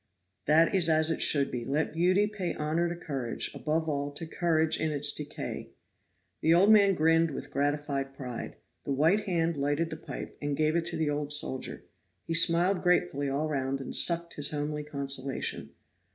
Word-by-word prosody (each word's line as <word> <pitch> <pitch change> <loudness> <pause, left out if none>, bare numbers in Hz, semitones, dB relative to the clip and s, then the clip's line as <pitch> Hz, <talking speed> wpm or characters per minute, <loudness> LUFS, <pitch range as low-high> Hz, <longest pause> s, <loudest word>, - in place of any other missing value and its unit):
"That 160 +3 +4
is 180 -4 +3
as 160 0 +3
it - - -2
should 140 -2 +3
be. 120 -1 -4
Let 145 +5 -2
beauty 185 +5 +2
pay 210 -4 -4
honor 160 +3 -1
to 170 - -4
courage; 135 -8 -4
above 160 +1 -2
all 145 -2 -2
to 165 - -6
courage 160 -1 +1
in 160 0 -1
its 145 0 +2
decay." 145 - -7 0.7
The 165 +1 +4
old 195 +5 +5
man 200 -3 +5
grinned 165 +1 +3
with - - -7
gratified 140 -1 -2
pride. 125 -3 -7 0.3
The 140 - -2
white 165 +10 +2
hand 170 -3 0
lighted 145 +4 -1
the 160 - -5
pipe, 160 - -9
and 145 -1 -2
gave 155 +1 +1
it 170 -1 0
to 170 -1 -4
the 155 -2 0
old 145 0 -3
soldier. 140 -3 +1 0.4
He 165 - -3
smiled 170 +3 +3
gratefully 145 -6 +1
all 145 +3 -1
round 135 -2 -2
and 135 - -5
sucked 170 0 +3
his 145 -1 +2
homely 150 0 -3
consolation. 140 -2 -2
155 Hz, 180 wpm, -28 LUFS, 145-170 Hz, 0.7 s, old